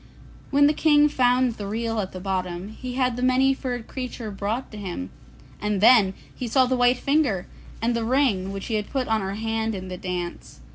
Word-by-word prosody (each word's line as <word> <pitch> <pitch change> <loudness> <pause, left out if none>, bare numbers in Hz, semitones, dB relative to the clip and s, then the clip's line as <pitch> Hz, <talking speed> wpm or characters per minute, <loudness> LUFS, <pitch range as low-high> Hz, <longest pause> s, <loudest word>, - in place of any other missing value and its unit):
When 285 0 +5
the 295 - +4
King 295 -1 +4
found 250 -3 +2
the 205 - -5
reel 225 +2 -2
at 190 -2 -3
the 185 - -7
bottom, 185 0 -3
he 250 +3 -7
had 255 -2 +1
the - - -3
Many 255 +1 +4
furred 245 -3 -4
Creature 245 -4 -5
brought 210 +6 -3
to 215 - -9
him, 175 - -5 0.5
and 210 -1 0
then 205 -3 +6 0.2
he 250 - -5
saw 260 +3 +4
the 255 +1 0
white 245 0 +4
finger, 275 - +1 0.4
and 235 +1 +1
the 230 - -1
ring 225 -7 +1
which 195 0 -5
he 230 - -4
had 210 -1 -1
put 265 -3 -1
on 220 -1 +1
her 195 +1 -3
hand 225 0 -2
in 185 -1 -6
the 180 - -5
dance. 180 - -5
225 Hz, 210 wpm, -24 LUFS, 195-255 Hz, 0.5 s, then